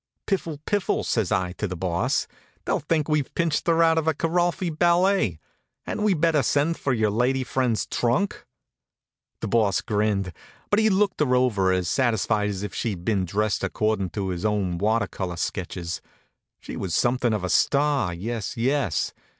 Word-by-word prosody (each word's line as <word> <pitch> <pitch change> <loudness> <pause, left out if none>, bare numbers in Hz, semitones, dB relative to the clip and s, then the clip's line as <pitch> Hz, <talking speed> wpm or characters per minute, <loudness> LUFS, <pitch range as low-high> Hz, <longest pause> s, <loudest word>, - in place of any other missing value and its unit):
"Piffle! 170 -6 -2
Piffle!" 205 -2 0
says 110 -6 0
I 90 -1 +1
to 105 - -1
the 90 - -5
Boss. 85 -1 0 0.4
"They'll - - +1
think 155 0 0
we've 150 -3 0
pinched 165 -2 0
her 165 0 +4
out 165 0 +4
of 160 - -4
a 160 - +2
Kiralfy 175 +2 0
ballet. 175 - +3 0.5
Hadn't - - -3
we 205 -3 +3
better 160 -2 +3
send 145 +6 +1
for 140 - 0
yer 110 -4 +1
lady 125 +4 +1
fren's 125 -3 0
trunk?" 125 +12 -1 0.9
The - - -2
Boss 105 -3 +2
grinned, 105 -4 0 0.4
but 205 - +4
he 220 0 +4
looked 200 -1 +1
her 130 -4 +3
over 105 -7 +2
as 90 -1 0
satisfied 110 -2 +1
as 100 -1 -4
if 105 - -5
she'd 95 -7 -3
been 100 -4 +1
dressed 105 +3 -1
accordin' 110 -4 0
to 100 -2 -2
his 90 -1 -4
own 100 -5 0
water 110 +4 +2
color 90 -3 -5
sketches. 90 -1 -4 0.6
She - - -8
was 95 -4 -3
something 120 -1 +2
of 105 -3 -1
a 90 - -2
star, 140 -8 +2
yes, 110 +6 -4
yes! 125 - 0
115 Hz, 175 wpm, -25 LUFS, 100-155 Hz, 0.9 s, her